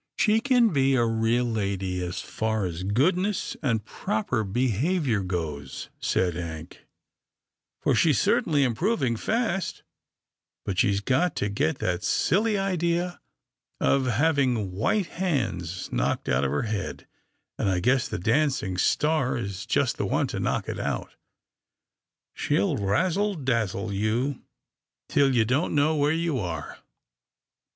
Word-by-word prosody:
" - - -62
" - - -63
She 215 0 +4
can 245 -3 +4
be 135 -1 +3
a 120 -2 +3
real 115 +2 +1
lady, 100 -5 -2
as 90 0 -4
far 110 -2 -2
as 85 -1 -4
goodness 175 - +1
and 115 -8 0
proper 110 +1 -2
behaviour 125 - 0
goes," 80 -7 -4
said 90 -2 +1
Hank, 80 -1 -7 0.5
" - - -62
for - - +3
she's - - +3
cer - - +3
tainly 145 -2 +1
improving 130 - +1
fast, 210 - -1 0.8
but 95 -2 -2
she's 100 0 +2
got 145 +9 +1
to 105 - -1
get 100 -5 0
that 90 +1 -2
silly 210 +5 +2
idea 175 -2 -1 0.6
of 135 -2 +2
having 125 - +1
white 110 - +1
hands 115 - -2
knocked - - -1
out 65 +2 +2
of 70 - +1
her 75 - 0
head, 105 -4 -4 0.5
and - - +1
I 95 -1 +1
guess 125 +6 +2
the - - -4
dancing 110 - +1
star 150 - +2
is 100 -5 -5
just - - +1
the - - -1
one - - +1
to - - -3
knock - - -1
it - - -4
out. - - -3 1.2
She'll 155 +2 +1
razzle 180 - +1
dazzle 115 - -1
you, 115 +7 -1 0.7
till 140 -2 +3
you 115 -2 +4
don't 140 +9 0
know 150 +2 +3
where 145 0 +2
you 165 -4 0
are." 80 -7 -5
120 Hz, 145 wpm, -26 LUFS, 100-160 Hz, 1.2 s, She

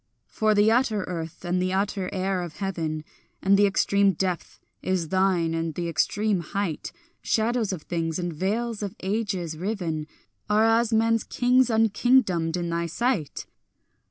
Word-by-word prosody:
For 215 -1 +1
the 205 +2 +5
utter 225 -4 +2
earth 165 -1 -6
and 180 +1 0
the 185 0 0
utter 195 -1 -1
air 190 -1 -1
of 175 -3 -7
heaven 165 -6 -3 0.4
And 195 +1 +4
the 205 +1 +5
extreme 200 0 +3
depth 180 0 -3 0.2
is 180 -4 -1
thine 185 -3 +2
and 165 -1 -2
the 175 -1 -2
extreme 200 +5 +1
height; 175 -1 -3 0.3
Shadows 225 -1 +1
of 175 -5 -5
things 165 -2 -2
and 175 -2 -3
veils 215 +7 -2
of 200 -2 -4
ages 190 -5 -2
riven 165 -4 -3 0.4
Are 215 +1 +4
as 225 +1 +3
men's 225 0 +2
kings 250 0 +2
unkingdomed 220 -6 +2
in 170 -1 -2
thy 170 0 -1
sight. 185 - -1
190 Hz, 155 wpm, -25 LUFS, 170-220 Hz, 0.4 s, the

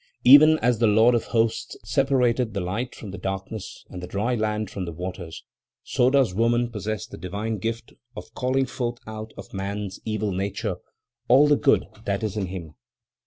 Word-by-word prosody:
"Even 150 +5 +8
as 120 -2 +2
the 115 - +4
Lord 110 +3 +5
of 120 - +1
Hosts 115 0 0
separated 125 -1 +1
the - - 0
light 100 +8 -3
from 105 - -8
the 95 - -7
darkness, 95 +2 -5
and 90 - -7
the 90 - -6
dry 105 +7 -1
land 110 -2 -1
from 95 -3 -4
the 85 - -5
waters, 85 -1 -7 0.4
so 125 - +2
does 130 -7 +3
woman 120 +3 +1
possess 110 -2 -4
the - - -11
divine 105 +4 -3
gift 115 +3 -4 0.2
of 110 - -9
calling 130 +2 +1
forth 120 -2 -3
out 110 0 -7
of - - -10
man's 100 0 -4
evil 110 -1 -2
nature 100 +1 -2 0.5
all 135 +4 +6
the 145 - +5
good 140 -1 +3 0.2
that 100 +1 -1
is 110 -1 -2
in 100 -3 -2
him. 85 -4 -7
110 Hz, 185 wpm, -24 LUFS, 100-120 Hz, 0.5 s, Even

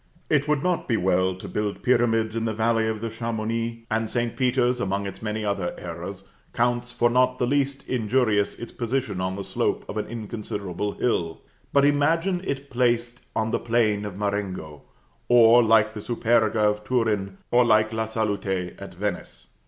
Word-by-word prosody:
It 145 -1 +3
would 150 -2 +1
not 180 -1 0
be 115 - +2
well 95 0 +2
to 95 - -9
build 105 -1 -3
pyramids 115 -3 +2
in 115 0 -1
the 110 -1 -1
valley 110 0 +2
of 110 -1 -2
Chamouni; 115 0 -3
and 110 0 0
St. 120 -1 -1
Peter's, 125 -1 +1
among 100 -3 -1
its 100 - -7
many 105 0 -3
other 100 -4 -2
errors, 90 +3 -7 0.3
counts 120 0 0
for 120 - +2
not 125 +1 +2
the 125 - +1
least 140 +1 0
injurious 110 -3 +1
its 120 - -8
position 120 -5 -2
on 95 0 -2
the 100 - -5
slope - - -1
of 105 - -6
an 105 - -2
inconsiderable 105 -4 -4
hill. 85 -9 -1 0.3
But 140 0 +4
imagine 165 +6 +2
it 140 -2 -4
placed 120 -1 0
on 110 0 0
the - - +1
plain 115 -3 +1
of 100 -3 -6
Marengo, 100 -7 -3 0.5
or, 120 0 +7
like 110 -1 +4
the 105 - -6
Superga 115 -1 +1
of 105 0 -1
Turin, 105 -5 0
or 125 +1 +5
like 110 -1 +3
La 110 0 -1
Salute 100 -5 -2
at - - -9
Venice! - - -5
115 Hz, 175 wpm, -25 LUFS, 105-120 Hz, 0.5 s, or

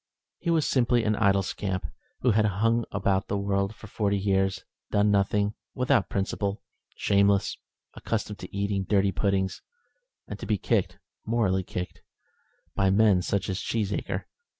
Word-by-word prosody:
He 170 - -3
was 165 -3 +2
simply 120 -2 +2
an 110 -1 +1
idle 100 -2 +3
scamp, 95 -2 -3 0.4
who 125 - +4
had 110 0 +3
hung 115 +3 +1
about 95 -1 0
the 100 - -1
world 100 +1 0
for - - -12
forty 100 -1 0
years, 95 -1 0 0.2
doing 105 0 +3
nothing, 100 +1 +2 0.2
without 125 -5 +2
principle, 100 +1 -2 0.3
shameless, 100 0 +2 0.4
accustomed 105 -2 -3
to 90 - -9
eat 100 -2 -1
dirty 100 -1 +3
puddings, 95 -1 0 0.7
and - - -7
to - - -6
be 105 - +2
kicked - - 0 0.3
morally 110 -5 +1
kicked 90 0 -6 0.7
by 95 - +1
such 95 - +3
men 105 -3 +5
as 90 - -4
Cheesacre. 100 +1 -1
100 Hz, 150 wpm, -27 LUFS, 95-110 Hz, 0.7 s, men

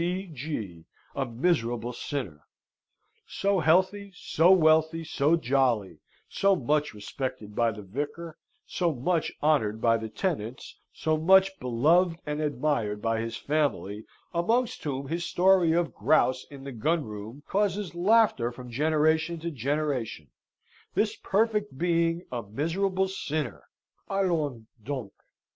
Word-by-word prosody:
C. 180 +3 -1
G. 110 - -6 0.3
a 135 -2 -2
miserable 120 -3 0
sinner! 105 - -5 0.8
So 200 -1 0
healthy, 190 +5 +2
so 170 0 +2
wealthy, 160 -2 +4
so 150 0 +2
jolly, 120 - +1 0.3
so 195 0 +2
much 150 -2 0
respected 105 -1 -5
by 115 -1 +2
the 105 -1 -9
vicar, 145 - -5 0.3
so 170 -4 -1
much 160 +6 0
honoured 110 -9 +2
by 115 0 +3
the 110 0 -6
tenants, 130 - -4
so 155 0 0
much 190 +4 +4
beloved 160 +8 +2
and 150 +1 -3
admired 135 -7 -1
by 115 +1 0
his 115 0 -4
family, 140 -9 -1 0.3
amongst 225 +8 0
whom 135 -1 -3
his 170 +4 -2
story 180 -2 +4
of 170 0 0
grouse 130 -4 +2
in 140 -2 -11
the 140 - -6
gunroom 120 -2 -3
causes 200 -2 0
laughter 180 - +3
from 125 0 -10
generation 155 +4 +2
to 170 +1 -3
generation; 135 - -2 0.6
this 215 +1 +1
perfect 210 - 0
being 170 0 +1
a 120 -2 -2
miserable 180 - -1
sinner! 155 -8 -4 0.4
Allons 160 - -1 0.2
donc! 130 -5 -5
150 Hz, 125 wpm, -27 LUFS, 120-175 Hz, 0.8 s, wealthy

